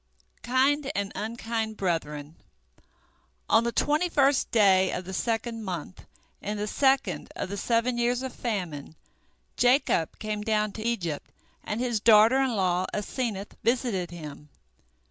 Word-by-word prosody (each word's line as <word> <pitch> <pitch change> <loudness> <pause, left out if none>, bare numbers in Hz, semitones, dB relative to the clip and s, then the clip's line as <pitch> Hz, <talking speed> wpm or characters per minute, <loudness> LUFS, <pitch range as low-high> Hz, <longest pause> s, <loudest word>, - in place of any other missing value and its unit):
KIND 270 +4 +2
AND 200 -1 -1
UNKIND 225 0 -3
BRETHREN 155 -4 -3 1.1
On 230 - +4
the 235 - 0
twenty 300 +8 +1
first 280 -3 +3
day 190 -4 +4
of 180 - -4
the 190 - -7
second 230 +2 -2
month 180 -2 -6 0.3
in 210 +1 -3
the 205 - -2
second 270 +5 +1
of - - -4
the 200 - -4
seven 235 +2 +1
years 245 +2 +1
of 260 - -5
famine, 175 - -4 0.6
Jacob 245 - +2
came 215 -1 -3
down 215 -1 0
to 215 - -8
Egypt, 180 -11 -2 0.3
and 210 - -3
his 240 -3 0
daughter 225 +4 +6
in 260 -4 +1
law 185 -2 +1
Asenath 210 -1 -3
visited 230 -7 0
him. 150 -3 -9
220 Hz, 140 wpm, -27 LUFS, 185-245 Hz, 1.1 s, daughter